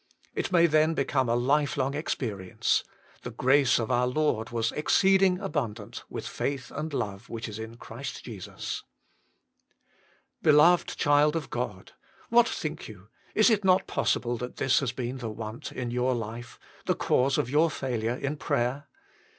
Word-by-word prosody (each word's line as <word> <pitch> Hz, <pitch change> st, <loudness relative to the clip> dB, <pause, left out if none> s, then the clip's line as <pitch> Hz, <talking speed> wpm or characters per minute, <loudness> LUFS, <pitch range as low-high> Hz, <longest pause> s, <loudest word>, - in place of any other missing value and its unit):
It -, -, -2 dB
may 170 Hz, -2 st, +5 dB
then 155 Hz, 0 st, +3 dB
become 135 Hz, -3 st, +1 dB
a 120 Hz, -, +2 dB
lifelong 135 Hz, +1 st, +1 dB
experience: 110 Hz, -, -1 dB, 0.2 s
" -, -, -29 dB
The -, -, -6 dB
grace 135 Hz, 0 st, +3 dB
of 115 Hz, -2 st, -2 dB
our 125 Hz, +1 st, +2 dB
Lord 125 Hz, -5 st, 0 dB
was 115 Hz, 0 st, -1 dB
exceeding 190 Hz, +3 st, +3 dB
abundant, 125 Hz, -, -4 dB
with -, -, -6 dB
faith 140 Hz, -2 st, -3 dB
and 155 Hz, +1 st, -4 dB
love 100 Hz, -4 st, -4 dB
which 115 Hz, 0 st, -5 dB
is 110 Hz, 0 st, -7 dB
in 110 Hz, +1 st, -7 dB
Christ 120 Hz, +4 st, -7 dB
Jesus." 105 Hz, -6 st, -6 dB, 1.6 s
Beloved 155 Hz, +4 st, +5 dB
child 145 Hz, +1 st, +3 dB
of 160 Hz, -3 st, -4 dB
God! 110 Hz, -6 st, -4 dB, 0.4 s
what 235 Hz, 0 st, +5 dB
think 155 Hz, 0 st, -4 dB
you, 105 Hz, -2 st, -13 dB, 0.3 s
is 215 Hz, +2 st, +5 dB
it 210 Hz, -2 st, +2 dB
not 190 Hz, 0 st, +4 dB
possible 120 Hz, 0 st, 0 dB
that 125 Hz, +1 st, -6 dB
this 130 Hz, -, +3 dB
has 135 Hz, -4 st, -1 dB
been 125 Hz, +1 st, -4 dB
the 115 Hz, -2 st, -4 dB
want 110 Hz, +1 st, -6 dB
in 125 Hz, -2 st, -4 dB
your 125 Hz, +1 st, +1 dB
life, 115 Hz, +1 st, -6 dB, 0.3 s
the -, -, +2 dB
cause 135 Hz, +2 st, +2 dB
of -, -, 0 dB
your 155 Hz, +3 st, +4 dB
failure 120 Hz, -5 st, -2 dB
in 140 Hz, +3 st, -3 dB
prayer? 140 Hz, 0 st, -1 dB
130 Hz, 160 wpm, -28 LUFS, 115-150 Hz, 1.6 s, may